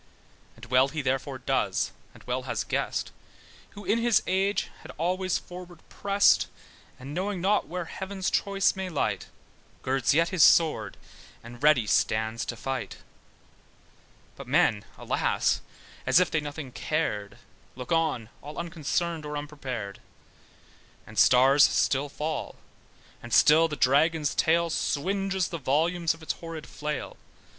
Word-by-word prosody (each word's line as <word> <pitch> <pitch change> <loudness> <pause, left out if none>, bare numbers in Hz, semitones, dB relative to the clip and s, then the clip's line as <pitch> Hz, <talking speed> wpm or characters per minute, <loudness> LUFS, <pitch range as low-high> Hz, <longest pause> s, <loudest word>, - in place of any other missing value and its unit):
And 115 - -12
well 130 +2 +4
he 150 +1 -4
therefore 135 +1 -1
does, 130 - 0 0.2
and - - -15
well - - -2
has - - -1
guessed, - - -2 0.7
Who 205 - -9
in 210 +5 +2
his 235 -2 +3
age 195 +2 0
has - - -12
always 185 +3 0
forward 180 -1 -10
pressed: 200 0 +3 0.5
And 135 +3 -9
knowing 190 +3 -2
not 200 +4 +1
where 175 +2 -4
heaven's 190 +2 -4
choice 195 -1 +1
may 190 -1 -4
light, 155 - -2 0.6
Girds 130 -1 +1
yet 165 +2 +3
his 185 -4 0
sword, 130 - +4 0.5
and 120 +2 -11
ready 145 -6 +4
stand 110 +1 +1
to 120 - -3
fight; 135 +3 -4 1.4
But - - -10
men, 105 -2 +2
alas, - - 0 0.5
as - - +6
if 180 - +2
they 155 - +1
nothing 145 -2 -6
cared, 105 -10 -2 0.4
Look 125 +3 -8
on, 160 -9 0
all 150 +2 -9
unconcerned, 170 0 -2
or 150 0 -4
unprepared; 130 -9 -6 1.1
And 110 -2 -4
stars 135 +6 +6
still 140 +2 +2
fall, 150 +1 -4 0.7
and 120 - -10
still 160 +6 +6
the 150 - -5
dragon's 150 +3 +2
tail 170 +1 +2
Swinges 190 +4 -1
the 170 - -5
volumes 165 +5 +1
of 165 - -16
its - - -1
horrid 165 -3 -8
flail. 150 -1 -5
155 Hz, 140 wpm, -27 LUFS, 135-175 Hz, 1.4 s, as